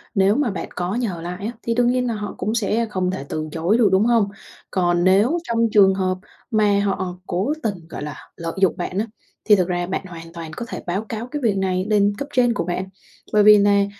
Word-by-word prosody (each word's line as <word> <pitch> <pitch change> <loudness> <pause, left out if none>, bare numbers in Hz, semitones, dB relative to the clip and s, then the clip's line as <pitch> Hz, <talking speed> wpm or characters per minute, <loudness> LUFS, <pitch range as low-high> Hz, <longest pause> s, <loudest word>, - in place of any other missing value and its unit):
nếu 195 +1 +4
mà 280 -3 +1
bạn 195 - -5
có 180 +3 -2
nhờ 210 -9 -2
lại 180 +4 -5
á, 225 - -2
thì 230 - 0
đương 245 0 +3
nhiên 250 0 +1
là 235 - -1
họ 210 -1 -5
cũng 215 +4 -2
sẽ 230 +1 +1
không 185 -2 -1
thể 140 -7 -5
từ 155 0 -3
chối 170 +8 +1
được, 225 -4 +4
đúng 190 +4 +4
không? 230 -4 +3 0.4
Còn 175 -2 +1
nếu 205 - +4
trong 230 -4 +1
trường 195 -2 +6
hợp 185 -1 0 0.3
mà 210 -2 +3
họ 190 -3 -1
cố 195 +12 0
tình, 185 -7 -3
gọi - - -6
là, 150 -2 -5 0.2
lợi 165 -1 -4
dụng 190 - +3
bạn 180 +1 -4
á, 220 - 0 0.4
thì 210 - +7
thực 180 -3 +1
ra 175 -1 -1
bạn 190 - -3
hoàn 165 -2 -10
toàn 165 -2 -7
có 240 - -4
thể - - -6
báo 195 +5 -2
cáo 225 +1 -4
cái 295 -1 -3
việc 215 -6 +1
này 185 -1 0
lên 205 -1 +3
cấp 280 - -4
trên 245 -2 +3
của - - -1
bạn 180 +2 -2 0.5
bởi 210 -1 +5
vì 210 0 +9
nà: 200 0 +4
200 Hz, 245 wpm, -21 LUFS, 180-220 Hz, 0.5 s, vì